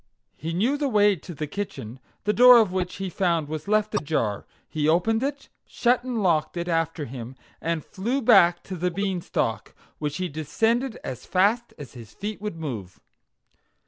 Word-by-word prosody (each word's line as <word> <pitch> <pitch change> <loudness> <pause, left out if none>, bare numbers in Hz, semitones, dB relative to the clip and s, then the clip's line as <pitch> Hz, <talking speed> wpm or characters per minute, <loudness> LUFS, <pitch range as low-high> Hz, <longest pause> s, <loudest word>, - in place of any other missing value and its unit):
he 165 - -5
knew 225 +12 +1
the 290 -1 0
way 205 -3 +4
to 175 - -11
the 155 - -3
kitchen, 135 - -6 0.2
the 210 - +1
door 250 +1 +9
of 220 -5 +4
which 180 -1 -2
he 195 0 -4
found 170 -4 0
was 155 +2 -5
left 215 0 +1
ajar; 135 -8 -1 0.2
he 155 -1 0
opened 220 +8 +2
it, 280 +1 -3 0.2
shut 245 0 +1
and 245 -4 -2
locked 170 -1 +1
it 170 0 -3
after 165 -2 -1
him, 125 0 -8 0.3
and 165 -2 -2
flew 235 +8 -2
back 175 -8 +5
to 190 - -6
the 180 +1 0
Beanstalk, 185 -1 -2 0.2
which 150 -1 -3
he 185 0 -2
descended 225 - -1
as 130 - -7
fast 210 +6 +1
as 145 -4 -10
his 115 -4 -12
feet 205 0 -5
would 210 -4 -4
move. 115 - -6
180 Hz, 175 wpm, -25 LUFS, 155-215 Hz, 0.3 s, door